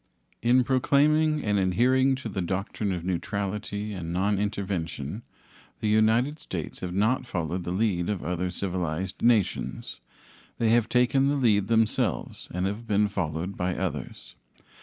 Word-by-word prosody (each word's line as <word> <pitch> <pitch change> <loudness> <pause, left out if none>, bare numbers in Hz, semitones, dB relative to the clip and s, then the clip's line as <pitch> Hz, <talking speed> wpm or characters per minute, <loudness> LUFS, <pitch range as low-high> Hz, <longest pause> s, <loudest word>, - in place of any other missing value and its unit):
In 125 +2 +4
proclaiming 150 +4 +3
and 105 -1 +1
adhering 130 +8 +3
to 130 -3 -6
the 100 -3 -3
doctrine 95 +3 -2
of 90 -2 -3
neutrality 100 +3 -3
and 85 -4 -5
nonintervention, 100 -3 -2 0.6
the 105 - 0
United 110 +7 +3
States - - -5
have 90 -1 -4
not 110 +6 +1
followed 85 0 -3
the 90 - -2
lead 95 -3 0
of 105 -4 -2
other 90 +2 -1
civilized 90 0 -3
nations; 115 -5 +1 0.6
they 115 - +2
have 115 -1 +3
taken 125 +2 +3
the 145 - +2
lead 105 -7 +3
themselves 115 -1 0
and 90 +1 -1
have 105 +4 -4
been 105 0 +3
followed 90 0 -3
by 90 0 -1
others. 75 -8 -4
100 Hz, 140 wpm, -27 LUFS, 90-115 Hz, 0.6 s, In